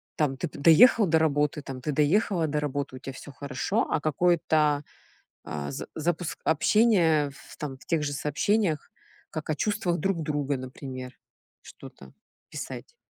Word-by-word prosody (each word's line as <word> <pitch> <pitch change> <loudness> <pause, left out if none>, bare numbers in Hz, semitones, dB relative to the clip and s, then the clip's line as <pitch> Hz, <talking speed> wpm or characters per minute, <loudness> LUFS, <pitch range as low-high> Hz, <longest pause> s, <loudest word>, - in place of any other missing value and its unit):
там: 135 -4 0
"Ты 175 - -2
б 145 - -11
доехал 205 - +7
до 160 -1 +4
работы? 150 -1 +1
Там, 130 -2 -7
ты 150 - -2
доехала 165 +4 +2
до 150 0 -1
работы, 140 -2 -3
у - - -11
тя 135 - -7
всё 145 - -10
хорошо?" 140 - -2
А - - +1
какое-то, 155 -1 +2 0.6
а, 70 -1 -5
за - - -6
запуск 160 -2 -2
общения 160 -4 +3
в 135 - -15
там 135 -3 -6
в - - -19
тех 165 -3 +1
же 145 -1 -2
сообщениях, 155 +4 0 0.4
как 155 -1 -6
о 155 - +1
чувствах 200 -1 -1
друг 185 0 -1
друга, 145 -2 -1
например, 130 0 -7 0.5
что-то 65 -1 -13 0.4
писать. - - -8
150 Hz, 160 wpm, -27 LUFS, 140-170 Hz, 0.6 s, доехал